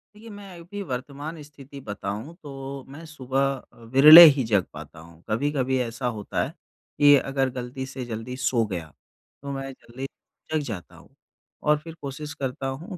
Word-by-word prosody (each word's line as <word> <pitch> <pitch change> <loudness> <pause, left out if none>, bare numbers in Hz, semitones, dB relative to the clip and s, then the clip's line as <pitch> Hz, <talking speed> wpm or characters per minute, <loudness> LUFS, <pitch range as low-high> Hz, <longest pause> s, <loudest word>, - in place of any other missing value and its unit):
देखिए 225 +2 -13
मैं 200 -4 -11
अभी 200 +4 -8
वर्तमान 145 +5 -6
स्थिति 140 -1 -13
बताऊँ 105 +5 -6
तो 135 -1 -7
मैं 155 +4 -10
सुबह 135 -4 -3 0.3
अ, - - -22 0.2
विरले 155 +5 +11
ही 135 -2 -1
जग 100 -4 +3
पाता 80 - -11
हूँ। 85 +1 -16
कभी-कभी 130 +2 0
ऐसा 120 +1 -3
होता 110 -4 -2
है - - -4 0.5
कि 145 0 +8
अगर 135 0 -1
गलती 125 +1 -6
से 135 -1 -7
जल्दी 115 +2 -6
सो 130 -3 +1
गया 85 -6 -6 0.5
तो 140 0 -6
मैं 135 0 -5
जल्दी 130 0 -9 0.5
जग 155 - +2
जाता 100 -6 -7
हूँ - - -17 0.5
और 150 0 +3
फिर 165 +1 -10
कोशिश 145 +1 -6
करता 135 -2 -4
हूँ 170 +8 -6
135 Hz, 170 wpm, -25 LUFS, 125-150 Hz, 0.5 s, विरले